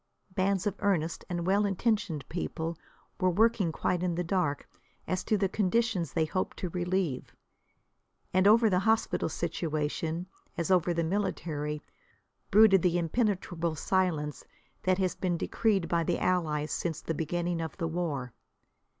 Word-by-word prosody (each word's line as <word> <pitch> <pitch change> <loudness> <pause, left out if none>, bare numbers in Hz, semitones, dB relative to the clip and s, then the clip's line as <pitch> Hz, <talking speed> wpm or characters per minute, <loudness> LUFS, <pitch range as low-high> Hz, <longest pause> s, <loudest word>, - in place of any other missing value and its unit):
Bands 190 +1 +1
of 205 - +1
earnest 170 -5 0
and 175 -1 -2
well 200 +3 +3
intentioned 200 - 0
people 165 -1 -3 0.4
were 185 -1 +3
working 205 -1 +3
quite 175 +2 -1
in 180 -2 0
the 175 - -1
dark 170 -5 -1 0.4
as 185 0 -1
to 215 - +2
the 195 -1 +2
conditions 200 - 0
they 160 -2 +1
hoped 185 +4 -2
to 180 - -3
relieve. 180 -6 -2 1.0
And 185 +2 +4
over 225 +2 +6
the 185 -4 +3
hospital 220 -4 +1
situation, 160 +1 -2 0.3
as 170 +2 -1
over 180 -1 +4
the 170 -1 0
military, 160 -5 -2 0.7
brooded 200 -2 +7
the 175 0 +2
impenetrable 175 -3 0
silence 160 -5 0 0.4
that 185 0 +2
has 185 -2 +1
been 180 -2 -1
decreed 195 -2 +1
by 170 -1 +1
the 170 +1 0
Allies 155 -4 0
since 165 -2 -2
the 165 - -2
beginning 170 +2 -1
of 160 - -5
the 165 -3 -1
war. 155 -8 -3
175 Hz, 150 wpm, -30 LUFS, 165-195 Hz, 1.0 s, brooded